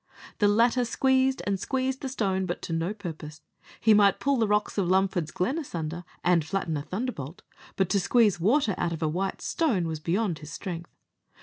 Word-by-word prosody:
The 205 - +4
latter 235 +4 +3
squeezed 265 +2 +2
and 200 -2 0
squeezed 265 +4 -1
the 270 - -3
stone, 190 -7 -1
but 175 - -4
to 165 - -4
no 165 +3 -1
purpose; 160 -7 -8 0.4
he 220 - +5
might 205 -1 +5
pull 280 -1 +1
the 225 -2 +2
rocks 210 0 0
of 185 - +1
Lumford's 185 -3 +1
Glen 240 - -1
asunder, 170 - -5 0.2
and 175 -2 +3
flatten 165 -1 -2
a 145 - -2
thunderbolt, 185 - -5 0.3
but 190 - +1
to 200 - +2
squeeze 210 -1 +3
water 220 - +2
out 170 - 0
of 165 0 -4
a - - +2
white 190 +5 -2
stone 245 - +1
was 160 -1 -4
beyond 175 +2 -1
his 150 0 -10
strength. 170 -1 -6
195 Hz, 195 wpm, -27 LUFS, 170-230 Hz, 0.4 s, he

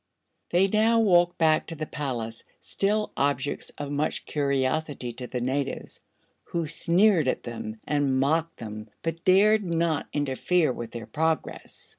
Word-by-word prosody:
They 180 +3 +3
now 220 +3 +3
walked 175 -5 +4
back 160 -1 +3
to 165 - -3
the 155 0 -4
palace, 120 -7 -4 0.2
still 210 +2 0
objects 140 0 -1
of 145 -1 -5
much 145 +2 -1
curiosity 140 -1 -1
to 125 +1 -6
the 125 -1 -4
natives, 135 +2 -3 0.4
who 170 -1 -2
sneered 170 +1 +3
at - - -1
them 110 -2 -6
and 140 -3 +1
mocked 160 +4 +1
them 110 -1 -8
but 165 0 -3
dared 210 +3 +5
not 170 -3 0
interfere 145 +2 +1
with 120 -2 -6
their 115 -1 -7
progress. 160 +5 -3
150 Hz, 145 wpm, -26 LUFS, 130-170 Hz, 0.4 s, dared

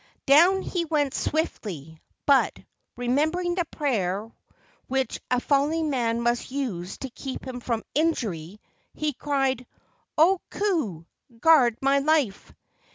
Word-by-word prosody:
Down 345 +7 +6
he 350 -2 -2
went 295 -4 0
swiftly, 165 - -3 0.2
but, 280 -2 +4 0.4
remembering 310 +9 +1
the 350 -1 0
prayer 220 - -2 0.6
which 265 0 -1
a 250 - +2
falling 295 +4 +1
man 235 -3 0
must 240 +1 0
use 230 -10 -4
to 270 - -6
keep 265 +2 -7
him 255 -1 -5
from 235 -2 -2
injury, 210 - -1 0.4
he 305 -1 -1
cried, 265 -2 -1 0.5
"O 355 +4 +5
Ku! 305 - -1 0.3
guard 255 -7 +5
my 275 +1 +4
life!" 280 -8 +1
270 Hz, 120 wpm, -25 LUFS, 230-310 Hz, 0.6 s, Down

